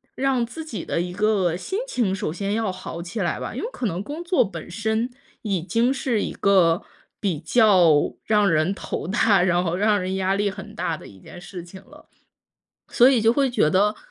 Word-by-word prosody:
让 260 -3 +1
自 320 +7 -8
己 235 -9 -6
的 - - -1
一 180 0 -4
个 200 -4 +1
心 380 - -4
情 225 - 0
首 185 - -2
先 200 +2 -3
要 220 -3 0
好 185 -2 -7
起 180 +6 -6
来 175 - -1
吧， - - -6
因 - - -4
为 455 - -2
可 250 - -5
能 180 -2 -2
工 305 +8 -6
作 350 +1 +3
本 170 -3 -8
身 220 +5 -1 0.3
已 195 -5 -1
经 235 +7 +1
是 245 -5 -1
一 - - -3
个 185 -3 +3 0.4
比 185 -7 -1
较 185 -5 +5 0.3
让 210 -3 +3
人 155 +5 +2
头 - - -5
大， 200 -1 +3
然 180 -1 +2
后 170 -1 -1
让 205 +1 +2
人 185 +1 -2
压 190 0 0
力 205 0 +1
很 210 +2 -10
大 165 - -2
的 - - -12
一 95 - -15
件 - - -12
事 175 -1 -8
情 185 +2 -12
了， 300 +4 -17 0.8
所 245 +2 +5
以 255 -4 +3
就 225 +1 +4
会 275 -1 +2
觉 235 - +2
得 205 +5 +2
200 Hz, 230 characters per minute, -23 LUFS, 180-230 Hz, 0.8 s, 较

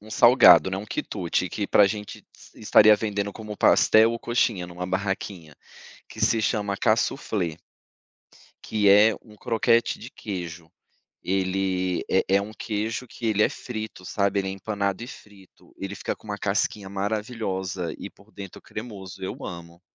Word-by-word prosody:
um 110 - -14
salgado, 110 - +7
né, 95 - -2
um 100 - -5
quitute 90 -3 -2
que 100 -2 -3
para 105 - +5
gente 105 0 -5 0.3
estaria 105 0 +6
vendendo 100 -2 -3
como 105 -2 -8
pastel 110 +1 +5
ou 115 - -4
coxinha 115 -7 0
em - - -12
uma 90 +1 -5
barraquinha, 95 -4 -4 0.5
que - - -10
se 115 - +3
chama 105 -2 -1
casuflê 105 - 0 1.1
que 105 -2 +1
é 105 +2 +6
um 105 -2 -17
croquete 115 +2 +1
de 120 - -10
queijo. 85 -5 -7 0.5
Ele 95 -1 -1
é 95 - +3
é - - 0
um 105 - -7
queijo 110 +3 -3
que 115 - -8
ele 105 -1 +3
é - - +3
frito, 110 -6 -7
sabe. 100 -1 0
Ele 95 - -2
é - - -3
empanado 100 +1 -3
e - - -8
frito, 100 -6 -16
ele 95 +1 -5
fica - - -4
com - - -22
uma 105 -1 -4
casquinha 100 0 -1
maravilhosa 100 -3 -3
e - - -7
por 105 +2 -23
dentro 100 -2 -10
cremoso, 100 -5 -9
eu - - -5
amo. 85 0 -9
100 Hz, 160 wpm, -25 LUFS, 95-110 Hz, 1.1 s, salgado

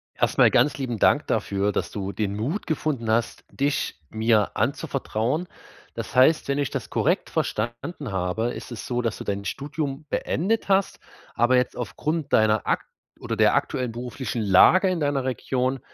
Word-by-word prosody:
Erstmal - - +4
ganz 145 -3 +3
lieben 120 -6 -3
Dank - - +3
dafür, 100 +1 0
dass - - -2
du 100 -1 -4
den 100 -1 -2
Mut 145 - -3
gefunden 145 -8 -1
hast, 115 +1 0
dich 140 - -1
mir 110 -1 +2
anzuvertrauen. 130 +11 -1 0.5
Das - - -6
heißt, 140 +5 +5
wenn 140 +1 0
ich 140 - 0
das - - -5
korrekt - - 0
verstanden 120 - -3
habe, 95 +6 -1
ist - - -9
es 115 - -6
so, 125 0 -1
dass 115 -2 -2
du - - -7
dein 100 0 -3
Studium 145 0 -4
beendet 210 +6 -1
hast. 195 0 +2 0.3
Aber 120 +2 +3
jetzt 125 - 0
aufgrund 150 +6 -3
deiner 110 -1 +3
akt - - 0 0.3
oder - - -3
der - - +4
aktuellen 125 -2 -1
beruflichen 120 +1 -4
Lage 110 - +6
in 180 -2 -1
deiner 145 -3 0
Region 130 0 -1
125 Hz, 165 wpm, -24 LUFS, 110-145 Hz, 0.5 s, Lage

